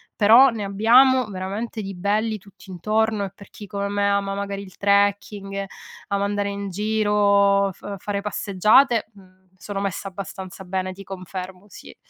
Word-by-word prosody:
però 230 +6 +7
ne 225 -4 -4
abbiamo 245 +6 +5
veramente 200 +5 -4
di 195 -1 -6
belli, 210 +4 0
tutt'intorno, 210 +2 -2
e 195 - -8
per 200 0 -15
chi 210 - -11
come 200 0 -3
me 200 0 0
ama, 200 0 0
magari, 200 0 -4
il 190 -2 -13
trekking, 200 0 0 0.4
ama 200 0 0
andare 205 0 -1
in 200 0 -5
giro, 200 -1 +2
f 200 +2 -8
fare 200 +1 -3
passeggiate, 210 +5 +3
uhm, 185 -1 -19 0.2
sono 205 -1 -5
messa 195 -1 -3
abbastanza 190 0 -8
bene, 185 0 -3
ti 195 +1 -11
confermo, 185 0 -8
sì. - - -13
200 Hz, 155 wpm, -22 LUFS, 195-210 Hz, 0.4 s, però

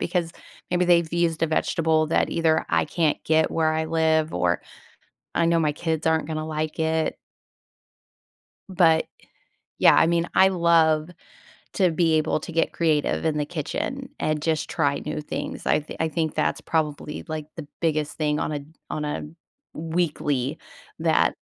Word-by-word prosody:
because 170 -3 -1 0.4
maybe 180 0 +2
they've 170 -2 +3
used 170 -2 0
a - - +1
vegetable 160 0 +1
that - - +2
either 160 -1 +2
I - - +3
can't 160 -4 0
get 160 0 +2
where 160 -1 +1
I 160 0 0
live, 160 -1 +1
or 90 -1 +1 0.7
I 170 - +2
know 170 0 +3
my 150 -2 +1
kids 160 0 -2
aren't 160 -1 +2
gonna 155 0 -3
like 155 0 -3
it. 160 0 0 1.5
But, 165 -4 +3 0.7
yeah, - - +6
I - - +5
mean, 170 0 +1
I 190 - +6
love 165 -3 +3 0.6
to 185 -3 +3
be 165 -1 +2
able 155 0 +1
to 170 - -8
get 165 - +1
creative 155 -2 +1
in 155 -2 +1
the 150 - 0
kitchen 180 - -4
and 155 -1 -1
just 160 -2 -1
try 145 -6 0
new 150 0 -3
things, 150 - -5
I've 150 - +2 0.2
I 160 - +1
think 160 -1 -2
that's - - 0
probably, 150 -2 -2
like, 155 -1 -4
the 155 -3 -7
biggest 155 -3 -1
thing 150 -1 0
on - - -2
a 145 - -3 0.3
on 150 - -3
a 150 - -3 0.5
weekly 150 -5 -1 0.4
that - - +2
160 Hz, 160 wpm, -24 LUFS, 155-165 Hz, 1.5 s, yeah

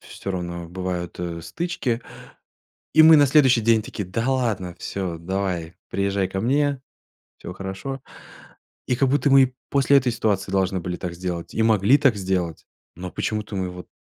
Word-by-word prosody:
всё 100 - -7
равно 85 -2 -5
бывают, 90 -1 -4
э, 85 -1 -4
стычки. 130 - -3 0.9
И 155 - +7
мы 160 0 +9
на 145 - +6
следующий 130 -4 +4
день 115 0 +3
такие: 105 -3 -6
"Да 115 +7 -1
ладно, 110 -9 -1
всё, 90 -4 -4
давай, 90 -1 -3 0.2
приезжай 100 -1 0
ко 95 - -4
мне. 140 +3 +1 0.6
Всё - - -8
хорошо." 95 +8 -6 0.9
И 125 - +2
как 135 0 +2
будто 140 0 +2
мы 135 0 +7
и 130 0 -5 0.2
после 140 0 +4
этой 125 -2 0
ситуации 100 -4 -1
должны 95 -1 +1
были 90 +1 -4
так 85 -1 -5
сделать, 85 -1 -5
и 110 - +1
могли 110 +5 +4
так 130 -6 +4
сделать, 90 -4 -2 0.3
но 90 0 -6
почему-то 105 -2 -3
мы 95 -1 -2
вот 90 0 -10
100 Hz, 170 wpm, -23 LUFS, 90-130 Hz, 0.9 s, мы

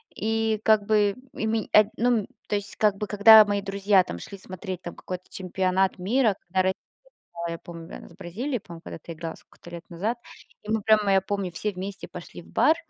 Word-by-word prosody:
И 220 0 0
как 215 -2 +4
бы, 205 -1 +3 0.2
и - - -3
ме 220 0 -1
а, 215 - +8
ну, 235 -3 +2 0.2
то - - 0
есть, 200 -1 -4
как 210 -2 +3
бы, 210 - -3
когда 215 +1 +9
мои 205 0 -1
друзья 195 -1 +3
там 85 - -7
шли 200 - -9
смотреть 185 0 -7
там 175 - -7
какой-то 185 0 -6
чемпионат 190 0 0
мира, 220 +3 +2
когда 185 +2 +1
ро - - 0 0.7
да, 170 - -3
я 165 - -5
помню. 170 -1 -10
Она - - -11
с - - -17
Бразилией, 205 - -4
по-моему, 170 -3 -11
когда-то 165 +1 -8
играла 165 0 -6
сколько-то 175 - -16
лет 170 0 -9
назад, 210 +8 -2 0.4
и 210 - -7
мы 220 -1 +1
прямо, 210 -2 +4
я 190 - +5
помню, 195 -2 -3
все 210 +5 -2
вместе 195 +1 -6
пошли 175 0 -10
в - - -19
бар. 315 - +4
200 Hz, 210 wpm, -26 LUFS, 180-215 Hz, 0.7 s, когда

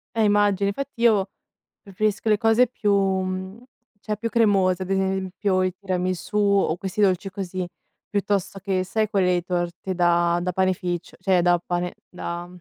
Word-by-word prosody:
Eh 225 - +1
immagino. 205 -1 +3
Infatti 250 +3 -4
io 215 -5 +4 0.6
preferisco 210 +2 -1
le 210 - +4
cose 225 +3 +4
più 210 -4 0
mhmm, 190 +2 -1 0.4
cioè 210 -1 -2
più 230 +1 -3
cremose, 195 -5 +2
ad 190 - -6
esempio 190 0 0
i 185 -1 0
tiramisù, 185 +1 -2
o 200 -5 +2
questi 195 +2 -3
dolci 195 0 +2
così, 185 -2 -4 0.4
piuttosto 200 -1 -1
che 190 -1 -1
sai, 215 +3 -1
quelle 180 -3 +2
torte 175 +1 -3
da 175 0 +3
da 180 0 -1
panificio, 185 -2 -1
cioè 185 -1 +2
da 175 0 +4
pane 175 0 -3
da 175 -1 -5
190 Hz, 150 wpm, -24 LUFS, 180-205 Hz, 0.6 s, io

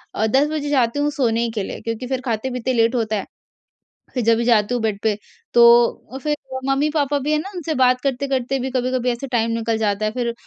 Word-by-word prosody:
अ, 220 - +1
10 270 +6 +3
बजे 295 -2 -2
जाती 260 -1 +1
हूँ 290 - +1
सोने 235 -4 0
के 205 - -1
लिए, - - -6
क्योंकि 230 +2 -4
फिर 260 0 -2
खाते-पीते 250 +2 -2
लेट 230 +1 +2
होता 220 -2 0
है। 200 - -3 0.9
फिर 250 -3 -1
जब 230 0 +4
भी 235 - 0
जाती 230 -1 +3
हूँ 240 - 0
बेड 210 -2 -1
पे, 215 -2 +1 0.4
तो 235 +2 +4
फिर 300 -1 0 0.3
मम्मी-पापा 290 +1 +1
भी 290 +3 -2
हैं 305 - +2
न, - - -4
उनसे 325 -2 -3
बात 255 -1 +3
करते-करते 270 -1 -1
भी 260 +1 -3
कभी-कभी 255 0 0
ऐसे 240 +3 -5
टाइम 230 -2 0
निकल 230 0 -1
जाता 215 -1 0
है। 215 - 0
फिर 235 0 -2
245 Hz, 220 wpm, -21 LUFS, 230-270 Hz, 0.9 s, जब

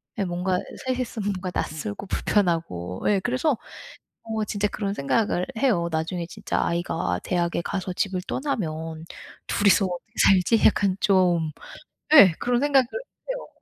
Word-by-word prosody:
네, 200 - -1
뭔가 180 +1 -1 0.3
3 255 -1 0
이 255 - -1
있으면 210 -4 -3
뭔가 185 -1 -5
낯설고 150 - -4
불편하고. 165 - -1
예. 200 - +3
그래서 255 +5 0 0.7
어 220 -1 -2
진짜 205 0 -1
그런 200 -1 -3
생각을 180 +3 0
해요. 205 -10 +2
'나중에 165 +2 -2
진짜 - - -3
아이가 95 - -1
대학에 170 -1 0
가서 185 0 -3
집을 185 -1 -1
떠나면 160 - -3 0.4
2 205 - 0
이서 195 +1 +5
어떻게 180 +4 -7 0.2
살지?' 195 +4 +4
약간 195 -3 +3
좀 180 -6 +2 0.6
예. 195 - +9
그런 245 0 +1
생각을 275 -3 +4 0.4
해요. - - -5
185 Hz, 290 characters per minute, -24 LUFS, 170-215 Hz, 0.7 s, 예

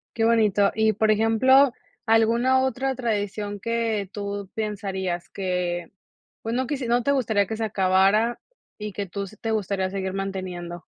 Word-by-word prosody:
Qué 225 - 0
bonito. 210 -3 +3
Y 220 0 +2
por 215 +2 +2
ejemplo, 245 +5 +4 0.3
¿alguna 235 +4 +3
otra 265 0 -1
tradición 205 -3 -2
que 225 -3 -1
tú 200 -1 -5
pensarías 195 -5 -3
que, 180 -2 -3 0.5
pues 225 +1 -3
no 260 0 0
quis 275 -4 -3
no 240 0 +2
te 280 - +2
gustaría 220 -7 +1
que 220 - -4
se 225 - -1
acabara 195 +3 +2 0.4
y 210 -2 -6
que 200 -2 -4
tú 200 +3 -4
s 195 +2 -10
te 225 +1 -4
gustaría 195 -3 -1
seguir 190 -1 -3
manteniendo? 185 -3 -5
210 Hz, 160 wpm, -24 LUFS, 195-230 Hz, 0.5 s, ejemplo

